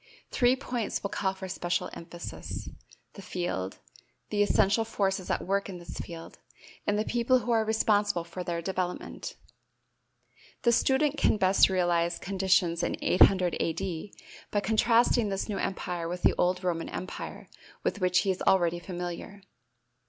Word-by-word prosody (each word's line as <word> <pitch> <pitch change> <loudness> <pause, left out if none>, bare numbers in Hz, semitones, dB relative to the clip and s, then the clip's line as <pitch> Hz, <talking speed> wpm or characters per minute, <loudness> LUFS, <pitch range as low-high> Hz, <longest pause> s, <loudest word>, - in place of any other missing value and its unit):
Three 245 0 +4
points 245 -4 -3
will 200 - -3
call 190 -1 -1
for 190 0 -7
special 175 -1 -2
emphasis: 170 +1 -7 0.5
the 200 - -10
field, 175 - -3 0.5
the 205 -1 +1
essential 205 +1 +3
forces 195 -4 -1
at - - -1
work 200 +1 0
in 185 - -6
this 175 - -8
field, 165 -1 -8 0.5
and 205 - +2
the 215 - 0
people 240 +2 +3
who 245 -1 -2
are 225 -1 +3
responsible 205 -4 +2
for 170 +2 -6
their 170 -1 -3
development. 185 -1 -4 1.3
The 235 - +5
student 275 +5 +2
can - - +3
best 190 -1 +5
realize 175 -2 +1
conditions 185 -3 +1
in - - -1
800 185 -1 +4
A.D. 175 +2 -3 0.3
by 205 - +1
contrasting 230 +1 +3
this 195 0 -2
new 205 -3 -3
empire 175 -3 -3
with 180 +1 -5
the - - +5
old 180 +1 +1
Roman 170 -2 -1
empire 185 - -6 0.4
with 205 - -1
which 180 0 +3
he 195 - +1
is 185 - -4
already 175 -2 +3
familiar. 180 +2 -6
190 Hz, 150 wpm, -29 LUFS, 175-210 Hz, 1.3 s, The